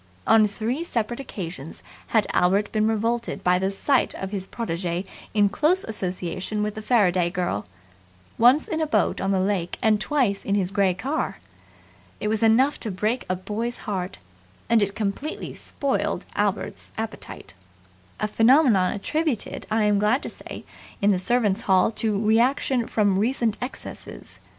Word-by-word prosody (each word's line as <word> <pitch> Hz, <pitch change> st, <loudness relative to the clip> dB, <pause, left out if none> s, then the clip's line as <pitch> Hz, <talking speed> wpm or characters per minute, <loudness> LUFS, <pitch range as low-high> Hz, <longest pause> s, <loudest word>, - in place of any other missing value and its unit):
On 220 Hz, -1 st, +6 dB
three 230 Hz, +9 st, -3 dB
separate 240 Hz, -6 st, -2 dB
occasions 170 Hz, -, -7 dB, 0.2 s
had 220 Hz, -3 st, +2 dB
Albert 195 Hz, +4 st, +2 dB
been 215 Hz, 0 st, +2 dB
revolted 230 Hz, +2 st, -1 dB
by 180 Hz, 0 st, +3 dB
the 190 Hz, +1 st, 0 dB
sight 255 Hz, +7 st, +1 dB
of 190 Hz, 0 st, -5 dB
his 195 Hz, -2 st, -4 dB
protege 175 Hz, -4 st, -3 dB, 0.3 s
in 205 Hz, -1 st, +5 dB
close 315 Hz, -, +2 dB
association 185 Hz, 0 st, -3 dB
with 210 Hz, 0 st, -2 dB
the 215 Hz, -, -6 dB
Faraday 185 Hz, -7 st, +3 dB
girl 175 Hz, -, -2 dB, 0.7 s
once 250 Hz, +6 st, +5 dB
in 320 Hz, -1 st, -2 dB
a 315 Hz, -, +1 dB
boat 295 Hz, -, +1 dB
on 195 Hz, -, 0 dB
the 195 Hz, -1 st, +2 dB
lake 185 Hz, -2 st, -1 dB
and 215 Hz, -1 st, +2 dB
twice 245 Hz, -10 st, +1 dB
in 200 Hz, -, 0 dB
his 190 Hz, -2 st, 0 dB
grey 195 Hz, -3 st, +2 dB
car. 275 Hz, -, -2 dB, 0.8 s
It 210 Hz, -, -1 dB
was 220 Hz, +1 st, 0 dB
enough 240 Hz, +6 st, +4 dB
to 225 Hz, -, -3 dB
break 215 Hz, +6 st, -1 dB
a 185 Hz, -, +1 dB
boy's 215 Hz, +6 st, -4 dB
heart; 190 Hz, -3 st, -3 dB, 0.5 s
and 230 Hz, -2 st, +5 dB
it 200 Hz, 0 st, 0 dB
completely 220 Hz, +9 st, -3 dB
spoiled 280 Hz, -2 st, -2 dB
Albert's -, -, -2 dB
appetite 225 Hz, 0 st, -7 dB, 0.7 s
a 215 Hz, -, 0 dB
phenomenon 225 Hz, -4 st, +4 dB
attributed, 295 Hz, +3 st, -2 dB
I 220 Hz, 0 st, +2 dB
am 210 Hz, -1 st, +3 dB
glad 215 Hz, +7 st, +2 dB
to -, -, -4 dB
say, -, -, -10 dB, 0.4 s
in 205 Hz, +1 st, +3 dB
the 185 Hz, -, +1 dB
Servants' 220 Hz, 0 st, +1 dB
Hall 190 Hz, +2 st, +3 dB
to 215 Hz, -3 st, +1 dB
reaction 235 Hz, +3 st, +2 dB
from 205 Hz, -3 st, +2 dB
recent 230 Hz, -1 st, +1 dB
excesses. 250 Hz, +2 st, -6 dB
215 Hz, 160 wpm, -24 LUFS, 195-240 Hz, 0.8 s, On